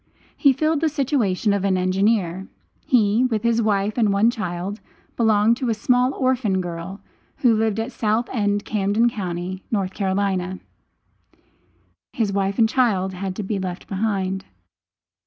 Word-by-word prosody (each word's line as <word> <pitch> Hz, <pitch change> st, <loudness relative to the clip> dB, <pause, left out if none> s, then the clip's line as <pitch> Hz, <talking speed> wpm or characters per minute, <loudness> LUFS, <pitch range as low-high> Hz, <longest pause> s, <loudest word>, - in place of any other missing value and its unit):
He 280 Hz, -, +4 dB
filled 310 Hz, +3 st, 0 dB
the 320 Hz, -, +2 dB
situation 245 Hz, -, 0 dB
of 200 Hz, -1 st, -1 dB
an 190 Hz, -2 st, +2 dB
engineer. 190 Hz, 0 st, 0 dB, 0.4 s
He, 225 Hz, -1 st, +3 dB
with 225 Hz, -4 st, -1 dB
his 235 Hz, 0 st, +2 dB
wife 210 Hz, +1 st, 0 dB
and 215 Hz, -3 st, +3 dB
one 205 Hz, +4 st, +3 dB
child, 190 Hz, -1 st, -4 dB, 0.3 s
belonged 220 Hz, 0 st, +3 dB
to 255 Hz, -2 st, -2 dB
a 225 Hz, -, +1 dB
small 250 Hz, +3 st, +2 dB
orphan 250 Hz, -7 st, +1 dB
girl, 175 Hz, +2 st, -6 dB, 0.4 s
who 245 Hz, -3 st, +4 dB
lived 220 Hz, -1 st, 0 dB
at 225 Hz, +3 st, -3 dB
South 220 Hz, +1 st, 0 dB
End, 205 Hz, -3 st, 0 dB
Camden 210 Hz, +3 st, +1 dB
county, 185 Hz, -2 st, -5 dB
N.C. 190 Hz, -2 st, -1 dB, 1.5 s
His 215 Hz, -4 st, -1 dB
wife 195 Hz, 0 st, 0 dB
and 225 Hz, -, +5 dB
child 215 Hz, -7 st, +1 dB
had 185 Hz, 0 st, -4 dB
to 210 Hz, -, -4 dB
be 200 Hz, 0 st, -2 dB
left 185 Hz, -1 st, -5 dB
behind. 195 Hz, -2 st, -1 dB
205 Hz, 145 wpm, -22 LUFS, 190-230 Hz, 1.5 s, and